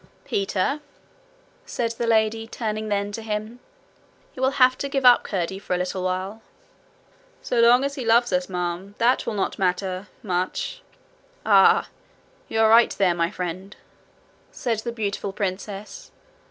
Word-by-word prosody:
'Peter,' 200 +8 -1 0.8
said 230 -1 -2
the 230 0 -3
lady, 225 0 +2
turning 215 -2 -4
then 200 0 -1
to 225 - -6
him, 215 +2 -4 0.7
'you 255 - -8
will 260 - +4
have 255 0 +5
to 280 - -4
give 270 -1 -1
up 245 -1 +8
Curdie 190 0 -3
for 185 - -2
a - - 0
little 180 +1 -3
while.' 185 +4 -3 1.0
'So 245 - 0
long 240 +3 +6
as 280 0 -1
he 270 - -5
loves 235 0 +3
us, 180 0 0
ma'am, 180 +2 -4
that 240 +2 +2
will 220 - -2
not 195 - -2
matter 185 +1 -1 0.2
much.' 180 -2 -2 0.6
'Ah! - - +5 0.6
you 225 - -2
are 220 - +5
right 230 +1 +7
there, 185 -3 +3
my 170 0 0
friend,' 185 +3 -6 0.8
said 230 -4 -2
the 235 +2 -4
beautiful 205 -3 -3
princess. 200 +1 -5
210 Hz, 155 wpm, -24 LUFS, 185-230 Hz, 1.0 s, up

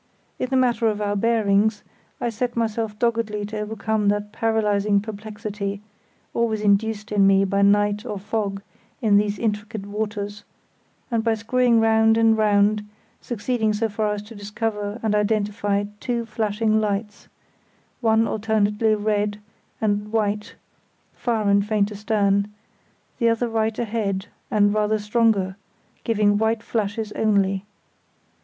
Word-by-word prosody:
In 255 - -2
the 265 - 0
matter 240 -3 +2
of 210 -1 0
our 205 -1 -1
bearings, 210 -1 +2 0.4
I 240 - -1
set 240 +2 -3
myself 225 -2 -1
doggedly 225 -2 0
to 215 +1 -5
overcome 210 0 -1
that 205 0 0
paralysing 210 -2 +1
perplexity, 210 -1 -5 0.5
always 225 -2 0
induced 210 +1 +1
in 200 -2 +4
me 195 0 +4
by 200 +1 0
night 205 +1 +3
or 205 - -4
fog 200 -1 -3 0.4
in 210 -3 +4
these 205 0 +1
intricate 210 -1 -3
waters; 205 0 -4 0.7
and, 230 -1 +1
by 225 -1 +2
screwing 235 +1 +2
round 225 0 +4
and 225 -1 +4
round, 210 0 +3 0.4
succeeded 225 -2 -1
so 225 +1 0
far 210 0 -1
as 205 - -6
to 215 +2 -12
discover 210 0 -4
and 220 -2 +1
identify 205 -1 0 0.2
two 235 -1 -2
flashing 215 0 0
lights—one 220 +2 -3
alternately 215 0 +1
red 210 0 -1 0.4
and 210 -1 -1
white, 210 -1 -1 0.6
far 225 -4 -1
and 200 0 +3
faint 210 -1 +1
astern; 205 -1 +1 0.7
the 235 -2 +3
other 230 +1 +1
right 225 -1 -1
ahead 205 -4 -2 0.2
and 205 -4 +3
rather 215 0 +1
stronger, 210 -3 +1 0.5
giving 205 -2 +2
white 220 +1 +1
flashes 215 -1 -2
only. 200 -3 +1
210 Hz, 135 wpm, -23 LUFS, 205-225 Hz, 0.7 s, in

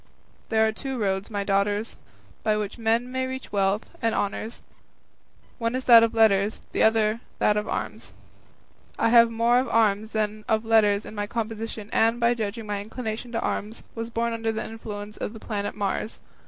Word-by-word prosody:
There 220 0 +3
are 220 - +2
two 265 +4 -5
roads, 195 -2 -1
my 205 -2 -2
daughters, 205 +2 0 0.5
by 215 -1 +1
which 210 +2 -4
men 230 +2 +1
may 260 0 -1
reach 260 0 -6
wealth 200 +1 0
and 225 -1 +1
honours; 210 +3 -3 1.0
one 230 +1 -1
is 260 - -2
that 235 -2 +9
of 230 0 +1
letters, 210 -2 +3
the - - -1
other 220 0 +3 0.2
that 210 - +3
of 210 0 -1
arms. - - -4 0.9
I - - +2
have 235 0 +7
more 230 +2 +3
of 255 -1 -2
arms 215 -2 +2
than 215 -1 -2
of 220 0 +1
letters 215 -2 +3
in - - -9
my 205 -1 -3
composition, 225 -1 -4
and, 230 +1 +3 0.2
judging 220 0 -4
by 205 -1 -2
my - - -4
inclination 225 +2 -5
to 230 - -1
arms, 215 +3 -3
was 230 0 -5
born 235 0 -1
under 225 0 -1
the 220 - -4
influence 210 -2 -7
of 210 - -4
the 225 - -9
planet 205 -2 -4
Mars. 205 +2 -2
220 Hz, 185 wpm, -25 LUFS, 210-230 Hz, 1.0 s, that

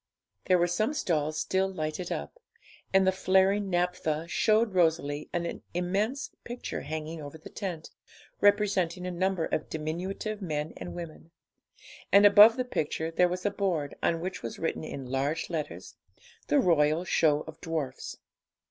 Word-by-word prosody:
There 185 - +4
were 175 - +3
some 215 - 0
stalls 155 - 0
still 190 0 0
lighted 155 0 -4
up, 75 - -5 0.5
and 190 0 +4
the 190 - +5
flaring 190 +1 +2
naphtha 175 -3 -1
showed 215 +4 +2
Rosalie 160 -4 +1
an 170 -1 -3
immense 200 +10 -1
picture 240 +1 -5
hanging 155 +1 -5
over 145 +2 -8
the 155 - -12
tent, 175 -6 -5 0.5
representing 200 -4 +2
a 180 - -2
number 185 -1 0
of - - -2
diminutive 185 +7 -4
men 155 -3 -3
and - - -7
women; 165 -1 -8 0.8
and 200 +1 +7
above 210 +3 +9
the 255 - 0
picture 160 -7 -2
there 180 +2 +3
was 180 +2 -4
a 205 - +2
board, 175 -8 -1
on 165 -1 +1
which 185 +1 -4
was 115 - -6
written 165 - -2
in 140 -3 -6
large 135 +7 -2
letters 155 -3 -5 0.5
'The 295 - +3
Royal 160 - +3
Show 150 -4 +3
of 160 0 -11
Dwarfs.' 155 -6 -4
175 Hz, 155 wpm, -29 LUFS, 155-195 Hz, 0.8 s, above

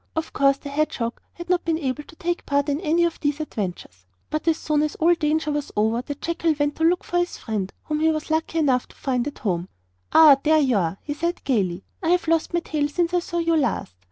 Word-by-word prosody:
Of 320 0 -3
course 275 0 +3
the 285 - -8
hedgehog 280 -5 -2
had 345 - -9
not 360 0 +1
been 330 -1 0
able 280 -2 -2
to 330 - -15
take 350 0 -3
part 285 +1 +1
in 285 +3 -1
any 335 0 +2
of 340 -1 -1
these 290 0 -1
adventures; 180 - -5 0.2
but 310 +2 -2
as 325 -1 +3
soon 300 -1 0
as 300 -1 -1
all 335 +2 +4
danger 310 -1 0
was 295 -1 -3
over, 220 +3 +2
the 285 +3 -6
jackal 330 +1 -1
went 290 0 0
to 320 - -1
look 350 +2 +3
for 350 - 0
his 350 0 -2
friend, 205 -4 -3
whom 305 -1 -2
he 320 +1 +3
was 310 0 -2
lucky 320 +1 0
enough 265 -6 +2
to - - -19
find 255 -1 -1
at 290 - -6
home. 180 -4 -2 0.4
'Ah, 305 -4 +8
there 315 +2 +4
you 270 -6 +3
are,' 175 0 -1
he 290 - -3
said 340 +4 -3
gaily. 195 -8 0 0.2
'I 330 - -1
have 355 -1 +2
lost 330 0 +1
my 345 0 0
tail 300 -3 -1
since 340 +3 -1
I 355 - +4
saw 345 0 -5
you 335 -1 +2
last. 250 - -1
300 Hz, 245 wpm, -23 LUFS, 265-330 Hz, 0.4 s, Ah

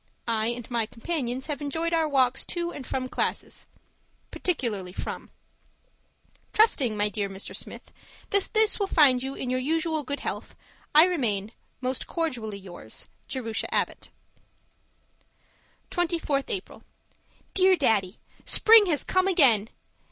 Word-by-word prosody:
I 220 -1 +1
and 240 0 -4
my 230 -2 0
companions 255 0 -4
have 295 -1 -4
enjoyed 325 +4 -2
our 325 -2 +2
walks 260 -3 +2
to 345 -1 -3
and 265 - -8
from 255 -1 -2
classes - - -3 0.6
particularly 215 - -3
from. - - -6 1.2
Trusting, 270 - +3
my 205 0 +2
dear 205 -1 -3
Mr. 195 0 -7
Smith, - - -8 0.4
that 400 -1 +2
this 440 0 +4
will 400 - 0
find 280 -9 +5
you 270 +1 -5
in 250 - -4
your 255 - 0
usual 315 +3 -1
good 285 +1 -4
health, - - -5 0.4
I 305 - +10
remain, 225 - 0 0.3
Most 255 0 -3
cordially 245 - -3
yours, 185 -3 -9 0.2
Jerusha 230 -4 -3
Abbott - - -1 1.8
24th 330 -5 -1
April 390 -5 -4 0.7
Dear 375 0 +5
Daddy, 215 - 0 0.2
Spring 440 -2 +8
has 305 -5 +1
come 370 0 +1
again! 245 - +4
270 Hz, 130 wpm, -26 LUFS, 230-335 Hz, 1.8 s, I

